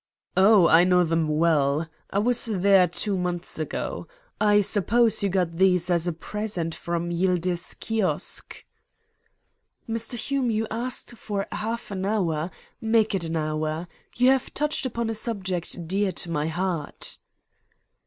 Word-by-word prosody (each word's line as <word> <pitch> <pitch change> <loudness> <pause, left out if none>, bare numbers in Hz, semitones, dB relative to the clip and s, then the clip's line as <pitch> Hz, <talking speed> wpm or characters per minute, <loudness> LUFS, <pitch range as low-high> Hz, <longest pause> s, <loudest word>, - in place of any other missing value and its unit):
"Oh, 195 -2 +6
I 165 +2 +6
know 180 0 +4
them 165 -1 +1
well. 155 -1 +2 0.2
I - - -2
was 240 +3 +2
there 195 -3 +4
two 175 +4 -2
months 180 -2 -3
ago. 155 - -4 0.3
I 210 -1 +5
suppose 215 +3 +3
you 200 - +1
got 180 -3 0
these 180 -1 +3
as 170 0 +1
a - - +1
present 175 -1 -4
from 170 +1 -3
Yildiz 175 0 0
Kiosk?" 225 -4 -2 1.2
"Mr. 230 +1 -2
Hume, 265 +1 -1
you 220 0 0
asked 245 +1 -2
for 205 -3 -3
half 220 +2 -4
an 190 -1 -3
hour, 175 -6 0 0.3
Make 220 -1 +2
it 185 -4 -1
an 165 0 -2
hour. 155 +2 -2 0.3
You 250 +1 +5
have 265 -1 0
touched 295 -2 0
upon 235 -2 -3
a 225 - -1
subject 190 -6 -3
dear 195 +2 +1
to 170 - -3
my 150 -1 0
heart." 170 -2 -3
185 Hz, 145 wpm, -25 LUFS, 170-220 Hz, 1.2 s, Oh